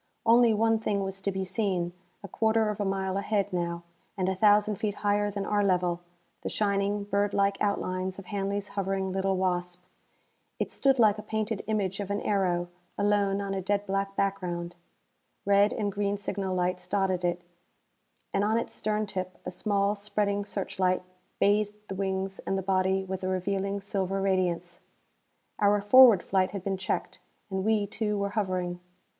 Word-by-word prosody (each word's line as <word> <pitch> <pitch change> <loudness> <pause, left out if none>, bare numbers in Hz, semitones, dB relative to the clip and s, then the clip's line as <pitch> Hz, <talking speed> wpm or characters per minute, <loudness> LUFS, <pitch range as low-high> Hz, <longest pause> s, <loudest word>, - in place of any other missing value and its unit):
Only 235 +1 +6
one 225 +1 +2
thing 205 -2 -1
was 195 0 -5
to 200 - -1
be 190 0 -2
seen: 185 -3 -1 0.3
a - - -6
quarter 220 +2 +2
of 210 - -5
a - - 0
mile 190 0 -1
ahead, 200 -1 0
now, 170 -1 -2 0.3
and 185 -1 0
a 190 - +2
thousand 210 +1 +4
feet 210 0 -2
higher 205 0 +2
than 200 -1 -3
our 205 -1 +1
level, 180 -3 +1 0.4
the - - -3
shining, 200 0 0
bird 200 0 0
like 200 0 +3
outlines 185 -2 -1
of 195 - -9
Hanley's 200 +1 -2
hovering 195 -1 -2
little 190 0 0
Wasp. 180 -1 -1 0.7
It - - -2
stood 270 -1 +2
like 215 -3 +4
a - - -4
painted 220 -1 -2
image 200 -3 -1
of 200 -1 -4
an 200 0 0
aero, 180 -4 0 0.3
alone 200 -1 +2
on 200 -1 -3
a 195 - -2
dead 205 +2 0
black 195 0 -2
background. 175 -3 -2 0.7
Red 200 +1 +4
and 205 -2 -1
green 200 0 -1
signal 195 -2 -3
lights 180 0 -1
dotted 190 -3 0
it, 175 0 -1 0.9
and 195 - +2
on 215 +2 +2
its 230 - -3
stern 215 0 -1
tip 185 -2 -5
a - - -3
small, 200 +2 +1
spreading 205 0 -1
searchlight 185 -2 -1 0.4
bathed 205 +1 +2
the - - -3
wings 190 0 -2
and 195 - -2
the 190 - -2
body 190 0 +1
with 190 0 -5
a - - -1
revealing 195 +2 -1
silver 195 -1 -2
radiance. 180 -3 0 0.8
Our 205 0 +4
forward 225 -1 +7
flight 190 0 +1
had 195 -3 -5
been 195 -1 -1
checked, 190 0 -3 0.3
and 190 0 -1
we, 215 -1 +2
too, 210 +1 -2
were 200 0 -1
hovering. 185 -4 -2
195 Hz, 175 wpm, -28 LUFS, 185-205 Hz, 0.9 s, forward